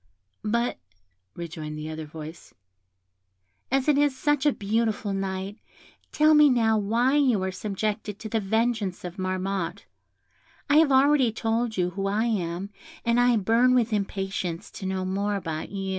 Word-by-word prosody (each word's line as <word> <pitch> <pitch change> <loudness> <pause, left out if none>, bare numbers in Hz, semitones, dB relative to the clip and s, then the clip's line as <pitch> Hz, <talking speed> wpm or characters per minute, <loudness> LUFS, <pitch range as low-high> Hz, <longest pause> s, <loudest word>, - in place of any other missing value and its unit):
"But," 235 +3 0 0.6
rejoined 155 -2 -6
the 155 +1 -5
other 155 -1 -6
voice, 155 +2 -10 1.1
"as 270 +1 +1
it 290 -2 +4
is 290 -2 +2
such 295 +1 +1
a - - +5
beautiful 215 -1 -1
night, 195 +1 -4 0.5
tell 310 +1 +4
me 300 -1 +7
now 225 -3 +3
why 230 +7 +2
you 250 -9 +3
are 190 - -1
subjected 210 +1 -3
to 220 - -7
the 225 +1 0
vengeance 220 -2 -1
of 180 +2 -7
Marmotte. 185 0 -2 0.8
I 290 +1 +4
have 315 -3 +5
already 270 -2 +4
told 225 0 -1
you 180 -1 +1
who 195 +2 -3
I 210 +3 +1
am, 190 -3 -2 0.3
and 235 +1 +3
I 245 -1 +4
burn 230 +5 +3
with 235 -2 +2
impatience 195 -4 -3
to 190 - -6
know 190 -1 -2
more 200 +2 -1
about 160 -5 -4
you." 195 -1 -4
210 Hz, 160 wpm, -26 LUFS, 190-240 Hz, 1.1 s, me